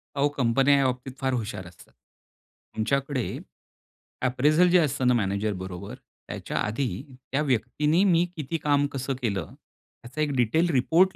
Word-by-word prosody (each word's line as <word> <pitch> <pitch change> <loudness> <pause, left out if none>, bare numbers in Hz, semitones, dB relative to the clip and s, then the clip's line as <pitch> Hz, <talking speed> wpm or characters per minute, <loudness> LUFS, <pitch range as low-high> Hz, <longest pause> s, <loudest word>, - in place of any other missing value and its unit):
अहो 140 0 +3
कंपन्या 135 +3 +4
या 140 - +3
बाबतीत 125 +1 -2
फार 130 -1 0
हुशार 105 -6 -4
असतात. 85 - -17 0.8
तुमच्याकडे 135 +3 0 1.0
अप्रेझल 150 +8 +4
जे 180 +1 +6
असतं 135 -5 +1
ना 125 - +5
मॅनेजर 105 -1 0
बरोबर, 95 +1 -7 0.3
त्याच्या - - -5
आधी 125 +5 -2 0.3
त्या 140 - +1
व्यक्तीनी 150 - +1
मी 175 -3 +4
किती 155 +1 -3
काम 145 -2 +2
कसं 135 0 -2
केलं? 100 -8 -2 0.5
याचा 130 +6 -5
एक 150 - +1
डिटेल 145 +9 +2
रिपोर्ट 165 +8 +3
135 Hz, 145 wpm, -26 LUFS, 115-150 Hz, 1.0 s, जे